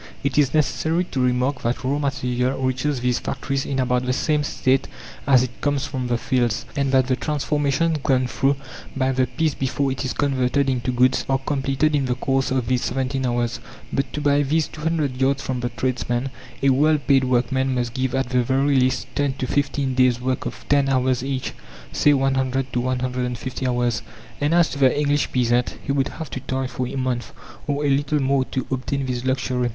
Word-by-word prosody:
It 140 -1 -1
is 140 -3 +3
necessary 160 +2 +1
to 130 - -1
remark 125 +2 +1
that 120 +2 -2
raw 140 +3 0
material 125 -2 -1
reaches 130 +1 -1
these 125 -1 +1
factories 135 0 -3
in 135 - -2
about 125 -1 +1
the 125 - +2
same 150 +3 +1
state 135 -2 +1 0.4
as 130 -3 +6
it 125 -1 -7
comes 145 -1 0
from 130 -3 -3
the 120 -1 +1
fields, 120 -2 0
and 140 -2 0
that 130 -1 +4
the 130 0 +1
transformations 150 +3 0
gone 130 -2 +2
through 135 +2 +1 0.4
by 130 0 +2
the 130 -1 +1
piece 145 +5 0
before 135 +1 -1
it 130 - -3
is 130 - -2
converted 135 -1 +1
into 125 0 -1
goods 125 +1 +3
are 135 - +3
completed 135 +2 0
in 140 -2 +1
the 125 -1 0
course 135 +1 0
of 130 -2 0
these 125 +1 0
17 135 0 -1
hours. 120 -1 -1 0.3
But 135 -2 -1
to 150 - -3
buy 145 0 +3
these 150 +2 +1
200 150 -5 -2
yards 135 +1 +2
from 130 -1 -2
the 120 0 -2
tradesman, 125 +1 -2 0.3
a 135 - +5
well 150 +4 +4
paid 135 -1 +3
workman 130 +1 +1
must 120 -1 -1
give 130 0 -1
at 135 -2 0
the 125 -1 +2
very 135 +3 +2
least 130 0 +1
10 145 -1 0
to 130 -1 -4
15 140 0 0
days' 130 -1 +3
work 130 0 -2
of - - -8
10 140 -1 +3
hours 130 -1 +1
each, 135 -1 -3 0.4
say 145 - +4
100 135 -1 0
to 125 - +1
150 125 0 -2
hours. 120 -2 0 0.4
And 150 +3 +2
as 170 -1 +4
to 145 - -5
the 135 +1 +4
English 145 0 +1
peasant, 120 -1 +1
he - - -2
would 135 -1 +1
have 160 -2 -8
to - - -4
toil 130 +1 -3
for 130 0 -3
a - - -6
month, 125 -3 -2 0.3
or 145 0 -1
a - - +3
little 145 +2 +1
more, 135 -1 +2
to 130 - -3
obtain 135 +1 -2
this 125 -1 -3
luxury. 130 -1 0
130 Hz, 205 wpm, -22 LUFS, 125-140 Hz, 0.4 s, as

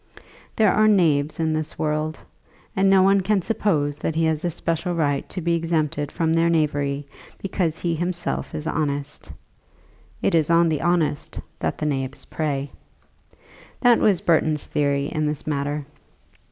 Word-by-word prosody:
There 215 -3 +4
are 215 0 +4
knaves 155 -8 +2
in 160 -1 +1
this 155 -1 -3
world, 155 0 -1 0.6
and 195 0 +3
no 190 -1 +6
one 195 +1 +4
can 195 0 +1
suppose 155 -9 0
that 160 - -2
he 165 0 +2
has 160 -1 0
a 175 - +1
special 165 +2 -2
right 145 -4 0
to 185 - -5
be 170 +1 +1
exempted 155 -3 -1
from 160 -2 0
their 165 +1 +3
knavery 145 -3 0 0.3
because 180 -4 -2
he 170 -1 -1
himself 175 +1 -2
is 150 - -5
honest. 145 -2 -3 0.9
It - - +2
is 160 -2 +2
on 170 0 +4
the 155 -2 -1
honest 165 -3 0 0.2
that - - -2
the 150 - -3
knaves 135 -3 -3
prey. 145 -3 -3 1.1
That 245 -2 +5
was 195 -5 +3
Burton's 155 -3 +1
theory 140 -1 0
in 155 +1 -1
this 150 0 -3
matter. 145 0 -2
160 Hz, 160 wpm, -23 LUFS, 150-175 Hz, 1.1 s, no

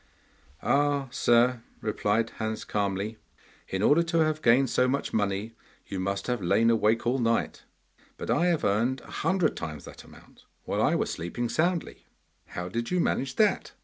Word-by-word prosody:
'Ah, 145 -1 +2
sir,' 120 -1 +3 0.2
replied 110 +1 0
Hans 110 -1 -3
calmly, 100 +2 -2 0.5
'in 95 +1 -2
order 150 +8 +5
to 170 0 -1
have 155 -1 0
gained 125 +1 +4
so 125 - +3
much 140 +2 -2
money 100 +1 -1 0.3
you 95 - -5
must 100 +1 -2
have 125 -3 -2
lain 115 +6 +3
awake 115 +1 +2
all 125 +3 +1
night, 115 -1 0 0.5
but - - -3
I 175 - +2
have 170 -3 +1
earned 115 +6 +1
a - - -14
hundred 185 -5 +1
times 75 -2 -6
that - - -11
amount - - -18 0.2
while - - -1
I - - +3
was - - -1
sleeping 115 +8 -3
soundly.' 170 +6 -1 0.4
'How 90 0 -5
did 115 +5 -3
you 180 - +1
manage 135 -5 0
that? 215 -1 +1
115 Hz, 170 wpm, -27 LUFS, 105-140 Hz, 0.5 s, order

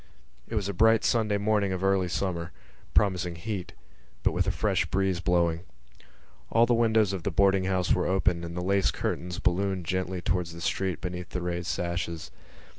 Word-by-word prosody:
It - - -5
was 100 -3 0
a 100 - -2
bright 110 +3 +4
Sunday 110 -3 +2
morning 100 -1 +1
of 95 0 -3
early 95 -1 +2
summer, 85 -1 -2 0.4
promising 90 -4 +2
heat, 95 +1 -5 0.5
but - - +3
with - - 0
a - - +3
fresh - - 0
breeze 95 -2 0
blowing. 85 -2 +1 0.9
All 115 +1 +5
the 120 - +2
windows 110 -3 +3
of 95 - -3
the 90 - -1
boarding 95 +1 +3
house 95 -1 +1
were - - +1
open 90 -2 +1
and 85 +1 -6
the 90 - -2
lace 100 0 +2
curtains 90 0 -3
ballooned 95 0 0
gently 95 +1 -2
towards 85 -1 -1
the 85 - -9
street 95 +1 -1
beneath 90 -1 -5
the 90 - -4
raised 85 0 -3
sashes. 85 -1 -3
95 Hz, 185 wpm, -28 LUFS, 85-100 Hz, 0.9 s, All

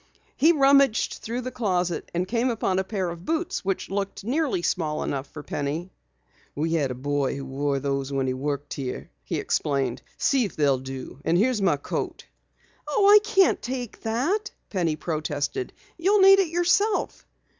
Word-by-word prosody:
He 320 +4 +5
rummaged 275 -5 +4
through 235 +3 -3
the 255 +1 -5
closet 180 -7 -1
and 175 +2 -1
came 235 +4 +1
upon 195 -5 0
a - - +1
pair 190 -3 -2
of 170 0 -9
boots 325 - -2
which 190 -1 -2
looked 195 0 -3
nearly 255 - 0
small 155 -4 -1
enough 135 0 -3
for 150 +1 -10
Penny. 150 +7 -3 0.6
"We 160 +3 -1
had 150 -5 +1
a 125 - -4
boy 140 +1 -1
who 140 0 -6
wore 140 +1 -1
those 140 0 -2
when 135 -1 0
he 130 - 0
worked 145 +2 -3
here," 130 -3 -5
he - - -3
explained. 135 -4 -1 0.2
"See 270 -2 +2
if 205 - -4
they'll 140 -3 +2
do. 130 0 -8
And 170 - +2
here's 230 +2 +2
my 175 -7 +3
coat." 140 - -4 0.6
"Oh, 395 +7 +3
I 420 - +10
can't 415 -3 +3
take 245 -2 -5
it," 270 - 0 0.2
Penny 170 -6 0
protested. 155 - -3 0.3
"You'll 395 +5 +3
need 390 0 +8
it 385 - +3
yourself." 350 +6 +1
185 Hz, 175 wpm, -25 LUFS, -, 0.6 s, I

